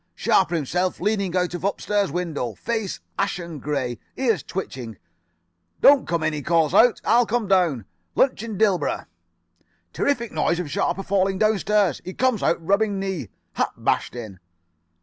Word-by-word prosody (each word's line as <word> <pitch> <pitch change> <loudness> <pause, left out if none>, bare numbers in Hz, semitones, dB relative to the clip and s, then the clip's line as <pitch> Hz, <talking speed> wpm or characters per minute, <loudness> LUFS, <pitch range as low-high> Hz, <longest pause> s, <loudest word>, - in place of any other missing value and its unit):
Sharper 175 -3 +2
himself 180 +4 -1
leaning 200 -2 0
out 180 -1 0
of 175 - -5
upstairs 200 -2 0
window. 155 - -3
Face 220 - -3 0.2
ashen 170 -4 -2
grey. 130 -4 -2 0.2
Ears 230 - +1
twitching. 125 - -6 0.8
'Don't 280 -1 +6
come 170 -1 -1
in,' 160 - +1
he 150 - -3
calls 160 0 +2
out, 240 0 +5
'I'll 235 0 +4
come 230 -2 0
down. 175 - +2 0.3
Lunch 265 - +2
in 220 -3 -5
Dilborough.' 190 -8 +1 0.9
"Terrific 235 -5 0
noise 160 +2 +1
of 165 -5 -4
Sharper 195 +5 -1
falling 195 0 +1
downstairs. 210 -4 +2
Out - - -20
he 185 - -6
comes, 255 -5 +1
rubbing 200 +4 +1
knee. 190 - -3 0.2
Hat - - -1
bashed - - 0
in. 110 -6 -8
185 Hz, 150 wpm, -23 LUFS, 155-210 Hz, 0.9 s, Don't